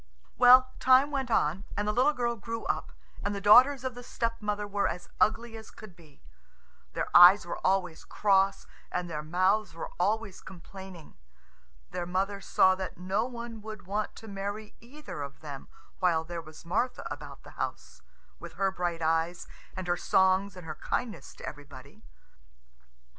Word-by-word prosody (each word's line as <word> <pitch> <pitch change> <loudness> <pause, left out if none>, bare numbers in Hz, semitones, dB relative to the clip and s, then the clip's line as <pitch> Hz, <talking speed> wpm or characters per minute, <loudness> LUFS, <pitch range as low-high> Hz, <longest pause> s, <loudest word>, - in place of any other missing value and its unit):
Well, 255 +1 +7
time 260 +3 +5
went 270 -3 -2
on, 180 -3 +1
and 205 0 -1
the 210 - +1
little 255 +6 +4
girl 240 -3 -1
grew 230 +1 -6
up, - - -2 0.3
and 200 0 -2
the - - -3
daughters 250 +7 +6
of 260 -1 -3
the 245 - -9
stepmother 220 -4 -3
were 205 0 0
as 180 - -5
ugly 230 +1 +1
as 220 0 -10
could 215 -5 -13
be. 155 -5 -20 0.7
Their - - -4
eyes 180 +3 +9
were 175 - -5
always 185 -4 0
cross, 195 -1 +1 0.3
and 180 0 -2
their 155 -3 -4
mouths 185 +5 +1
were 165 - -6
always 205 +1 -1
complaining. 190 - -12 0.7
Their 175 -1 -4
mother 195 +2 -1
saw 190 -1 +4
that 185 0 -6
no 185 +5 -1
one 235 -3 -7
would 215 -2 -9
want 205 +3 -3
to 225 - -12
marry 205 +1 -5
either 255 - -9
of 140 -1 -8
them 145 -3 -8 0.3
while 170 -3 +2
there 170 +1 -6
was 155 0 -14
Martha 240 +9 -1
about - - -8
the - - -13
house, - - -6 0.4
with - - -10
her 195 -1 0
bright 175 -3 -3
eyes 165 +2 0 0.3
and 185 - -4
her 175 0 0
songs 190 +1 +2
and 180 -2 -10
her 155 - -5
kindness 225 +7 -4
to - - -9
everybody. 145 +5 -11
195 Hz, 170 wpm, -29 LUFS, 175-225 Hz, 0.7 s, eyes